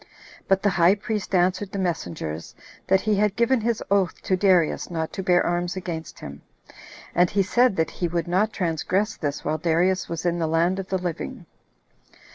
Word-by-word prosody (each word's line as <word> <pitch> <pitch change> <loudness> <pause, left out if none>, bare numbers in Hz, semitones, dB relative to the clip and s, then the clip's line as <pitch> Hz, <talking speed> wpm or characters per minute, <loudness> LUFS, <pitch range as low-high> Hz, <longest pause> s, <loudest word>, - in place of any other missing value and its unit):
But 195 0 +2
the 205 - +3
high 175 +2 +4
priest 210 -2 -3
answered 185 +2 +1
the - - -4
messengers, 85 - -4 0.3
that 190 0 +4
he 215 - +1
had 205 0 +1
given 235 +1 +2
his 230 0 -1
oath 195 -4 +2
to 190 - +1
Darius 185 -4 +2
not 160 -2 -3
to 195 - -3
bear 180 -1 +3
arms 175 +1 -1
against 170 -3 -6
him; 70 0 -9 0.7
and 175 0 +3
he 200 -1 +2
said 240 +3 +3
that 160 -2 0
he 175 - -2
would 170 0 -2
not 190 +5 +1
transgress 185 +3 -1
this 145 -2 -4
while 155 - -1
Darius 175 +3 +1
was 165 0 -4
in 175 0 +1
the 165 - 0
land 170 +4 +1
of 190 - -5
the 190 - 0
living. 180 -3 -5
180 Hz, 190 wpm, -24 LUFS, 170-195 Hz, 0.7 s, high